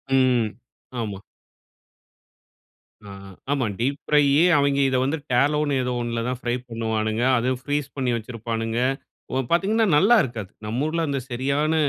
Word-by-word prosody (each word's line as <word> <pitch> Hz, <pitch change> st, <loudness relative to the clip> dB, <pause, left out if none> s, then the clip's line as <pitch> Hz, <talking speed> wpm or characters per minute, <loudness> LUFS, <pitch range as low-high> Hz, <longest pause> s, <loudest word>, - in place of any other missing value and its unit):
ம். 125 Hz, -4 st, +3 dB, 0.5 s
ஆமா. 100 Hz, -4 st, -4 dB, 1.9 s
ஆ. -, -, -10 dB, 0.4 s
ஆமா. 140 Hz, -3 st, +1 dB
டீப் 140 Hz, +4 st, 0 dB
ஃப்ரையி 145 Hz, -2 st, +4 dB, 0.2 s
அவுங்க 140 Hz, -1 st, +2 dB
இத 130 Hz, -, +1 dB
வந்து 145 Hz, +4 st, 0 dB
டேலோனு 145 Hz, +3 st, +2 dB
ஏதோ 125 Hz, 0 st, -2 dB
ஒன்னுல 120 Hz, -1 st, -2 dB
தான் 125 Hz, -1 st, -3 dB
ஃப்ரை 120 Hz, 0 st, -1 dB
பண்ணுவானுங்க, 110 Hz, 0 st, -1 dB
அதும் 125 Hz, +2 st, 0 dB
ஃப்ரீஸ் 145 Hz, 0 st, -2 dB
பண்ணி 130 Hz, -3 st, 0 dB
வச்சிருப்பானுங்க, 115 Hz, 0 st, -3 dB, 0.5 s
ஒ -, -, -1 dB, 0.2 s
பார்த்தீங்கன்னா 210 Hz, +6 st, +2 dB
நல்லா 205 Hz, +9 st, +5 dB
இருக்காது. 110 Hz, -6 st, -6 dB
நம்ம 115 Hz, +6 st, -2 dB
ஊர்ல 165 Hz, +1 st, -1 dB
அந்த 140 Hz, -1 st, -1 dB
சரியான 140 Hz, +5 st, 0 dB
130 Hz, 135 wpm, -23 LUFS, 115-145 Hz, 1.9 s, நல்லா